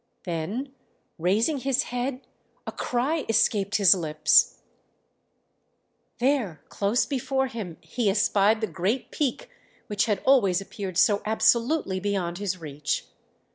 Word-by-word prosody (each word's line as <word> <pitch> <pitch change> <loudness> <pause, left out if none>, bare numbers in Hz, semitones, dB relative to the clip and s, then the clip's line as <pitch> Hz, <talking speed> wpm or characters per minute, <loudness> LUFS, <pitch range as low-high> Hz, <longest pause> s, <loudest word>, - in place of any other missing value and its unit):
Then 195 - -4 0.5
raising 215 - +1
his 265 -1 +1
head 250 +2 -4 0.4
a - - -4
cry 270 +6 -1
escaped 205 -2 +2
his 200 -3 +6
lips... 155 -4 +3 1.6
there 240 - 0
close 205 +5 +1
before 265 -1 -1
him 215 -9 -6
he 235 -5 -1
espied 205 +2 +2
the - - +1
great 195 +7 -2
peak 300 - -2 0.3
which 205 -1 0
had 210 -4 0
always 215 -10 +4
appeared 195 -2 -6
so 205 +1 +4
absolutely 230 0 +1
beyond 185 -3 -2
his 195 -3 -2
reach. 150 -3 -4
210 Hz, 120 wpm, -26 LUFS, 185-250 Hz, 1.6 s, his